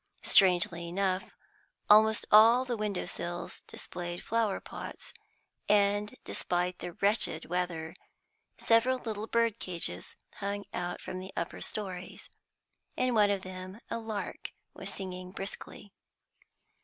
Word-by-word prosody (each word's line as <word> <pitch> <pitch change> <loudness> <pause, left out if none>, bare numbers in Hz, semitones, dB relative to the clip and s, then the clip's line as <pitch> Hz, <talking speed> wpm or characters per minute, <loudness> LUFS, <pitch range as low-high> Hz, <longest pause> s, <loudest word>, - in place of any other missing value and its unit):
Strangely 175 -2 +4
enough, 185 +1 0 0.6
almost 215 +1 +6
all 230 +4 +8
the 245 -2 -1
window 210 -3 -2
sills 175 0 -5
displayed 175 0 -5
flower 225 -3 +1
pots, - - -8 0.6
and, 205 +2 +3
despite 180 0 -1
the 175 - -5
wretched 200 -5 +1
weather, 170 -2 -2 0.6
several 240 +3 +4
little 220 -3 -4
bird 230 -1 +2
cages 170 - -4 0.2
hung 200 0 -3
out 175 0 -3
from 185 - -5
the 190 +1 -7
upper 170 - -3
storeys. 185 -4 -5 0.7
In 255 -1 +2
one 210 -2 +5
of 200 -2 0
them 185 +2 -7
a - - -1
lark 220 -2 -5 0.2
was - - -6
singing 185 -1 -6
briskly. 200 0 -7
195 Hz, 120 wpm, -31 LUFS, 180-215 Hz, 0.7 s, all